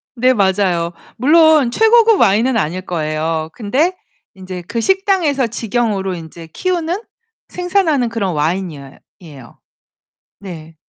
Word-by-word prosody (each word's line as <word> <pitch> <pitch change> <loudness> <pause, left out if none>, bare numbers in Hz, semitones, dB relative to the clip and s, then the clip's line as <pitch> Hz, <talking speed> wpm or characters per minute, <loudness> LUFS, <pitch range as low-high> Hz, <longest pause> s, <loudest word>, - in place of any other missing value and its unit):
네. 255 +1 +3
맞아요. 190 -5 +1 0.3
물론 305 0 +4
최고급 445 - +4
와인은 225 +5 +3
아닐 185 -1 -2
거예요. 160 -1 -2
근데 270 - 0 0.4
인제 185 -1 -8
그 230 - -2
식당에서 370 - +1
직영으로 220 -4 -2
인제 165 0 -10
키우는, 350 - -2 0.5
생산하는 355 -8 0
그런 205 -6 -2
와인이여 155 -3 -3 0.2
이에요. 145 -9 -14 0.8
네. 165 -5 -10
210 Hz, 270 characters per minute, -17 LUFS, -, 0.8 s, 물론